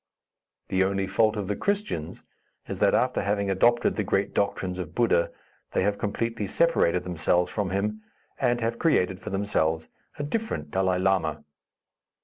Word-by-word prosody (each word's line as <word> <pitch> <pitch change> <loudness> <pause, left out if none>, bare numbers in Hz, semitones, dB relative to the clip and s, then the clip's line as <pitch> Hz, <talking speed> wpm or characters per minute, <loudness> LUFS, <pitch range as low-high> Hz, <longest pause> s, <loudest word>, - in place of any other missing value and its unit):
The 95 0 +3
only 95 0 0
fault 110 +2 +2
of 105 -3 -3
the 105 - -1
Christians 200 - -2 0.4
is - - -5
that - - +4
after - - +1
having 100 0 0
adopted 120 +5 +3
the 105 - +1
great 100 +1 0
doctrines 95 -2 -1
of 85 -2 -6
Buddha, 110 -8 +3 0.4
they - - +2
have 100 +1 0
completely 110 0 -2
separated 95 - +2
themselves 90 +1 +1
from 105 -4 -1
him, 105 +3 -1 0.4
and 120 -2 +1
have 115 +1 -1
created 95 - +2
for 105 - -7
themselves 80 -6 0 0.3
a 145 - -3
different 145 - -3
Dalai 95 -1 +1
Lama. 90 -5 +1
100 Hz, 155 wpm, -26 LUFS, 90-110 Hz, 0.4 s, that